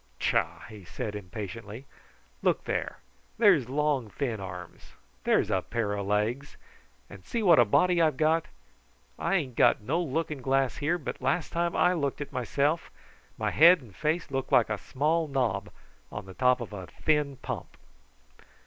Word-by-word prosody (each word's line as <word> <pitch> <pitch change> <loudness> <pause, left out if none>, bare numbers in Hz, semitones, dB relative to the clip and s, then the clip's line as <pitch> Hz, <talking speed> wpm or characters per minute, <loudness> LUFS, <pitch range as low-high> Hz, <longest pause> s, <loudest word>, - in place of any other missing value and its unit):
"Tchah!" - - 0
he 105 -3 -11
cried 105 +4 -5
impatiently. 105 +4 -7 0.6
"Look - - +1
there - - -3 0.4
there's 185 - +4
long 140 -4 0
thin 120 -3 -3
arms! 90 -2 -9 0.3
There's - - +2
a 95 - +2
pair 115 -1 -2
of 100 -1 -3
legs! 110 +7 -1 0.5
And 100 -2 -13
see 230 - -3
what 170 -8 +6
a 120 - +7
body 175 - +3
I've 155 -5 +2
got. 160 +2 +2 0.7
I 195 - +1
ain't 135 -10 -1
got - - +4
no 150 +11 0
looking 155 -2 -2
glass 135 -2 +1
here, 150 +4 0
but 150 - -6
last 175 -5 0
time 170 0 -1
I 180 - +4
looked 140 -6 -2
at 145 - -6
myself 140 +6 0 0.5
my - - -1
head 170 +4 +7
and 115 -9 -16
face 155 +4 -1
looked 135 -1 -3
like 115 -2 +4
a 105 - -1
small 155 +4 0
knob 135 -4 -1 0.4
on 105 -1 -6
the 95 - -10
top 125 +3 +2
of 115 - -7
a 95 -3 -7
thin 150 -3 0
pump." - - -6
135 Hz, 165 wpm, -28 LUFS, 110-155 Hz, 0.7 s, a